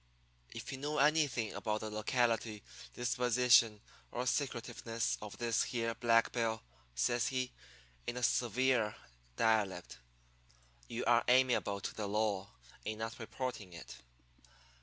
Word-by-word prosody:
"'If - - -6
you 135 - -5
know 150 +2 -2
anything 145 -7 +2
about 110 0 -2
the 110 -1 -5
locality, 110 -1 0 0.3
disposition, 120 -2 +4 0.3
or 125 +1 -2
secretiveness 120 -3 -1
of 105 -1 -8
this 120 -1 +1
here 115 -2 -1
Black 115 -1 +3
Bill,' 115 -2 -1 0.3
says 120 - +1
he, 130 -1 -1 0.6
in 120 - -2
a 125 - -3
severe 120 -1 +2 0.4
dialect, 105 -5 +1 0.9
'you 115 - -4
are 120 0 +5
amiable 125 -5 +3
to - - -4
the 105 -2 -4
law 100 -2 0 0.3
in 110 0 -3
not 110 +2 -5
reporting 115 -5 -5
it.' 85 - -9
115 Hz, 125 wpm, -34 LUFS, 110-125 Hz, 0.9 s, are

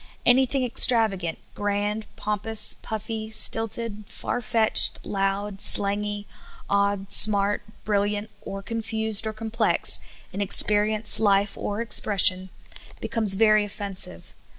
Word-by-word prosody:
Anything 260 +2 +1
extrava 225 -3 +3
gant, 170 -3 -7 0.2
grand, 205 +1 -4
pompous, 210 +1 +1
puffy, 220 0 -7
stilted, 225 -1 +1
far 245 - -6
fetched, 225 -1 0
loud, 195 0 -4
slang}^, 205 +1 +3 0.4
odd, 200 -1 -2
smart, 205 -1 +5 0.2
brilliant, 205 +1 -3
or 195 0 -9
confused 220 -1 -3
or 220 - -5
complex, 220 +1 -1 0.3
in 200 - -5
experience, 210 +2 +4
life, 200 -1 0
or 205 +2 -6
expression, 195 -4 +1 0.5
becomes 220 -5 +1
very 215 0 +2
offen 200 -1 -8
sive. 85 - -4
210 Hz, 110 wpm, -22 LUFS, 200-220 Hz, 0.5 s, smart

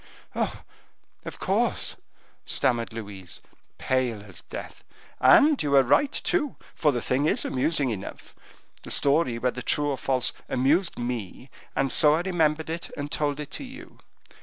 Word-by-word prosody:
oh! - - -2 0.6
of - - -7
course," - - 0 0.5
stammered 120 -2 +1
Louise, 100 -5 -8 0.4
pale 125 -5 0
as 100 -4 -10
death. - - -9 0.4
"And 280 - +6
you 140 -1 +1
are 135 - +7
right, 275 - +3
too, 290 -2 0 0.2
for 150 - +2
the 120 -3 -2
thing 140 +4 +1
is - - +2
amusing 135 0 +1
enough. 100 -3 -7 0.5
The - - -10
story, 140 -4 +2
whether 125 +1 -1
true 145 +3 +1
or 135 -3 -2
false, 130 -2 0 0.2
amused 150 +9 +2
me, 120 0 -5 0.2
and 135 -1 +1
so 150 0 +5
I 165 - 0
remembered 160 -3 0
it 165 +1 -4
and 145 0 -4
told 145 -1 -1
it 150 -1 -6
to - - -5
you. 270 +6 -11
135 Hz, 155 wpm, -26 LUFS, 120-155 Hz, 0.6 s, are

